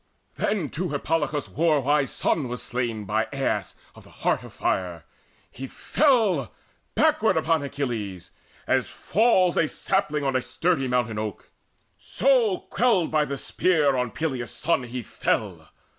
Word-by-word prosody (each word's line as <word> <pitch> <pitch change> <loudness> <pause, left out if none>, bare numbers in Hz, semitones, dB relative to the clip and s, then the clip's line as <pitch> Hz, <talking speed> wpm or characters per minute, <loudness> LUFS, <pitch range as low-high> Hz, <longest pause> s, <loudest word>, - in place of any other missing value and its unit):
Then 195 -9 -1
too 180 +3 -3
Hippolochus' 150 0 -1
war 160 -2 +2
wise 145 0 +2
son 145 -5 0
was 125 0 -5
slain 115 -3 -3
By 110 +3 0
Aias 135 -1 -2 0.2
of - - -15
the - - -17
heart - - -1
of - - -11
fire. 90 -3 -2 0.5
He 135 +2 -7
fell 215 - +2 0.4
Backward - - +3
upon 165 -1 +2
Achilles, 115 -11 -4 0.3
even - - +2
as - - -9
falls 190 -5 +2
A 165 - +3
sapling 150 0 0
on 135 -1 0
a 130 - +2
sturdy 160 -1 0
mountain 120 -4 0
oak; 105 -2 -6 0.5
So 235 -5 +2
quelled 220 -9 +2
by 155 -1 +2
the 140 -1 -4
spear 150 -3 +2
on 125 -1 0
Peleus' 130 -4 -3
son 165 -7 0
he 120 0 -5
fell. - - -2
140 Hz, 150 wpm, -25 LUFS, 125-170 Hz, 0.5 s, Backward